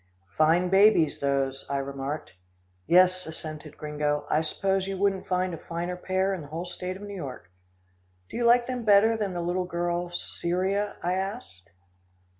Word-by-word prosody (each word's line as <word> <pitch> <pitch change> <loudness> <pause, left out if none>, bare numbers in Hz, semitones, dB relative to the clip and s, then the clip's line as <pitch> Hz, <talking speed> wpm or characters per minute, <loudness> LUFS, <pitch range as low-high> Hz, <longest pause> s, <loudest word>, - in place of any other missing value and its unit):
"Fine 165 +4 +3
babies, 195 -4 +5
those," 135 -1 0
I 140 - 0
remarked. 140 +2 -4 0.6
"Yes," 185 +1 +4
assented 155 -1 -8
Gringo, 150 -1 -1
"I 155 - +3
suppose 190 +4 -1
you 195 0 -3
wouldn't 195 -1 0
find 185 -1 0
a 165 - -6
finer 175 +2 -4
pair 190 +2 0
in 185 - -4
the 145 - -9
whole 165 +4 -5
state 180 +1 -5
of 200 - -11
New 205 0 -7
York." 135 - -7 0.8
"Do - - -10
you 240 - 0
like 240 +1 +5
them 250 -1 -3
better 215 +1 +5
than 205 -4 -2
the 175 - -3
little 180 +1 -1
girl, 175 0 -2
Cyria?" 185 +4 -1
I 175 +1 +1
asked. 190 - -5
180 Hz, 170 wpm, -27 LUFS, 155-195 Hz, 0.8 s, babies